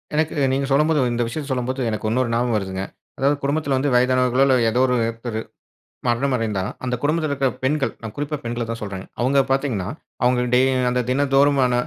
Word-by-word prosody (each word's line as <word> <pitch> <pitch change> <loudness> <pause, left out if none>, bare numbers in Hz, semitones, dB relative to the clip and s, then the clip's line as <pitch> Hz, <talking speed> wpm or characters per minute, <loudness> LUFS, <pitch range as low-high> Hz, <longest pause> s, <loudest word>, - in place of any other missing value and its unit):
எனக்கு 155 +1 0 0.2
நீங்க 135 +1 0
சொல்லும்போது 150 +2 +3
இந்த 120 0 0
விஷயத்தை 140 +5 -5
சொல்லும்போது, 130 +1 -2
எனக்கு 110 0 -3
இன்னொரு 120 +1 +1
ஞாபகம் 120 -1 +1
வருதுங்க. 95 -1 -3 0.3
அதாவது 140 +2 +2
குடும்பத்துல 140 -1 0
வந்து 140 +2 +1
வயதானவர்களோ, 125 +1 +3
இல்ல 135 - +4 0.2
ஏதோ 125 - 0
ஒருத்தரு 115 -2 -1 0.7
மரணம் 130 +3 +1
அடைந்தா, 105 -5 -1 0.2
அந்த 125 -1 -1
குடும்பத்துல 155 0 +1
இருக்க 135 -1 +1 0.2
பெண்கள் 140 +2 +1
நான் 110 -2 -7
குறிப்பா 145 +1 -2
பெண்கள 120 0 -3
தான் 115 0 -3
சொல்றேங்க. 95 -3 -6 0.2
அவுங்க 135 +3 +3
பார்த்தீங்கன்னா, 130 -9 0 0.4
அவுங்க 125 0 +3
டே 125 - +6 0.3
அந்த 125 0 +1
தினந்தோறுமான 135 -1 +3
125 Hz, 170 wpm, -22 LUFS, 115-140 Hz, 0.7 s, டே